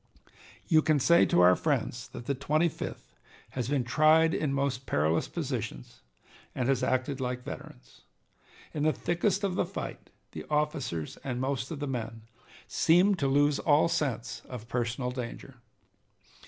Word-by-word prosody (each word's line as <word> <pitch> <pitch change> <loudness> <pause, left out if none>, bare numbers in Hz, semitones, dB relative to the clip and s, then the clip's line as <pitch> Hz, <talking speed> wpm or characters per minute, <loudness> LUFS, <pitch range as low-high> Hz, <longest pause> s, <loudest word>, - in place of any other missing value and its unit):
You 160 -3 +5
can 155 -1 +2
say 170 +6 +5
to 90 - +3
our 90 +1 +7
friends 125 - -1
that 120 - -9
the 140 - 0
Twenty 155 +5 +1
fifth - - -8 0.4
has 125 -2 -3
been 140 -3 +1
tried 155 +6 +4
in 150 -3 0
most 135 -1 -1
perilous 80 +3 +1
positions - - -5 0.5
and 125 - -1
has 135 -2 +2
acted 130 +1 0
like 125 0 -3
veterans. - - -10 0.7
In 150 - -3
the 155 +1 +3
thickest 190 +3 0
of 195 -2 0
the - - +1
fight - - -7 0.2
the - - -7
officers 150 - -2
and 125 -2 -3
most 130 -1 -2
of 160 - -5
the 145 - -2
men 115 -4 -5 0.4
seemed 180 +3 +3
to 140 - +1
lose 145 +1 +3
all 150 +1 +4
sense 135 -8 -2
of 120 -3 -8
personal 120 +1 -2
danger. 125 +1 -7
135 Hz, 155 wpm, -29 LUFS, 120-155 Hz, 0.7 s, our